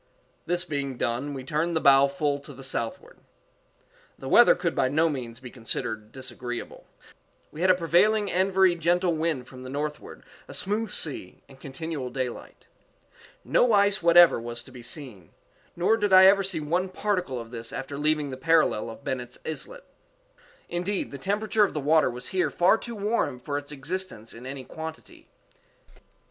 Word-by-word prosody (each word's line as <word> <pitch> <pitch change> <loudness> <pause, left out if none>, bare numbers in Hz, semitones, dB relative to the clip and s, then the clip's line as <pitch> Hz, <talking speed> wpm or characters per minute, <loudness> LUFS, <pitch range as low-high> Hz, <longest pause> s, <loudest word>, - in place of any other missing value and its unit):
This 175 +1 0
being 140 -5 -3
done, 125 +5 -2
we 130 - -6
turned 160 +5 -1
the - - +3
bow 140 -1 +6
full 140 +1 -1
to 145 +1 -11
the 135 - -11
southward. 120 -3 -5 1.0
The - - -8
weather - - +7
could - - -1
by 130 - +2
no 160 +4 +2
means 120 -5 -5
be 125 -2 -10
considered 115 -2 -4
disagreeable. 125 -1 -6 0.6
We 155 - -8
had 185 - +3
a 185 - +7
prevailing 195 +5 +2
and 190 +2 +1
very 190 -1 +4
gentle 175 +1 +1
wind 155 -5 -2
from 130 -1 -12
the 130 - -8
northward, 150 +2 -5 0.2
a - - -7
smooth 210 +2 0
sea, 140 - -3
and 135 -1 -17
continual 140 -1 -5
daylight. 130 -2 -6 0.8
No 245 -2 +3
ice 200 0 +3
whatever 170 -5 +6
was 120 0 -6
to 130 - -15
be 125 -1 -11
seen; 120 - -8 0.4
_nor 215 +6 +2
did 205 -2 0
I 185 0 +9
ever 195 +1 +6
see 190 -4 -1
one 175 +5 -1
particle 185 -9 -2
of 115 0 -9
this 115 -1 -6
after 135 +1 -6
leaving 150 0 0
the 130 - -6
parallel 155 -7 +2
of 115 +5 -11
Bennet's 125 -2 -4
Islet._Indeed, - - -7
the 140 - -7
temperature 210 +4 +1
of 200 - 0
the - - 0
water 155 0 +3
was 125 +1 -5
here 185 -1 +1
far 180 +5 +3
too 235 -1 -7
warm 205 - -1
for 145 +3 -5
its 145 0 -4
existence 145 - -5
in 125 +3 -10
any 135 0 -6
quantity. 160 +4 -9
150 Hz, 175 wpm, -26 LUFS, 130-185 Hz, 1.0 s, I